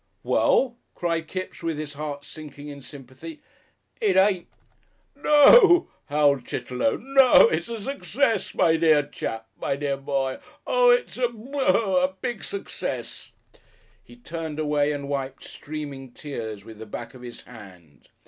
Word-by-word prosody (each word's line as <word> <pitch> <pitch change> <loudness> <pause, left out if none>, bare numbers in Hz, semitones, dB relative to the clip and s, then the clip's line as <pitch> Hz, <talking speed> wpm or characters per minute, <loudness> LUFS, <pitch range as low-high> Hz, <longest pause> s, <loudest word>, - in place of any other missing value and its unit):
"Well?" 250 -3 +2 0.2
cried 165 -2 -2
Kipps, 185 +2 -6
with 165 -2 -2
his 150 -1 -6
heart 145 -1 -6
sinking 145 -1 -10
in 140 -1 -9
sympathy, 135 - -11 0.6
"it 425 -3 +2
ain't 190 -2 +3 0.4
" - - -42 0.2
"No," 345 - +6 0.2
howled 145 -3 +2
Chitterlow; 125 +7 -2
"no. 270 - +6
It's 350 - -2
a 230 -1 -4
success! 270 -3 -1
My 165 0 +3
dear 155 -2 +4
chap! 115 -5 -5 0.2
my - - 0
dear 140 -1 -2
boy! 135 -1 -2 0.3
oh! - - +4
it's 485 0 +2
a 250 -1 +1
bu 235 +3 -13
boo 285 - -3
hoo! 190 0 +3
a 185 +1 +1
big 240 -5 -4
success!" 395 - -6 0.7
He - - -16
turned 165 -9 -6
away 150 -1 +1
and 140 -1 -4
wiped 135 -1 -4
streaming 140 -4 -8
tears 110 -8 -7
with 110 -1 -12
the 110 - -9
back - - -7
of 130 - -13
his 120 -1 -9
hand. 90 - -15
155 Hz, 155 wpm, -24 LUFS, 135-230 Hz, 0.7 s, No